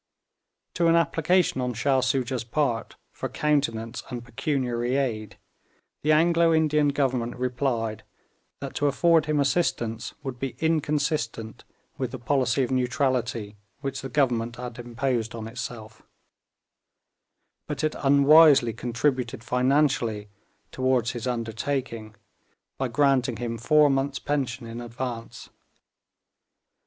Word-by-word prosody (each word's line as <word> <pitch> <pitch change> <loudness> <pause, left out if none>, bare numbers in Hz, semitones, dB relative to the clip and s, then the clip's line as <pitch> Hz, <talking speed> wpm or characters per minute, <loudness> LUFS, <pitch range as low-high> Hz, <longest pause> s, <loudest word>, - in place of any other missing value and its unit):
To 170 -1 +2
an 165 - +5
application 170 -2 +2
on 125 -1 -2
Shah 135 +3 +2
Soojah's 130 -1 0
part 120 -2 -1 0.2
for - - -5
countenance 130 -6 -1
and 120 -2 -6
pecuniary 125 -2 -1
aid, 115 -6 -2 0.6
the 155 - +2
Anglo 165 +1 +4
Indian 150 -2 +3
Government 130 -4 0
replied 120 -3 -2 0.6
that 140 -1 -5
to 145 - +2
afford 160 +3 +3
him 150 -1 +1
assistance 120 -6 0
would 130 -3 -5
be 135 0 -4
inconsistent 150 -8 -1 0.3
with 130 -2 -1
the 130 - -6
policy 130 +1 +1
of 125 - -3
neutrality 125 -5 -1 0.2
which 135 -1 -4
the 135 - -6
Government 120 -4 0
had 120 0 -7
imposed 120 -1 -2
on 110 -1 -6
itself; 115 -2 -7 1.7
but - - -4
it 155 - +1
unwisely 140 -3 +6
contributed 120 0 -1
financially 125 -5 +1 0.4
toward 130 -2 +1
his 120 0 -4
undertaking 115 -1 -3 0.6
by 135 - 0
granting 130 -1 +2
him 115 -1 -4
four 150 +5 +5
months' 135 0 0
pension 135 -4 -2
in 115 +1 -7
advance. 120 0 -6
130 Hz, 120 wpm, -26 LUFS, 120-145 Hz, 1.7 s, unwisely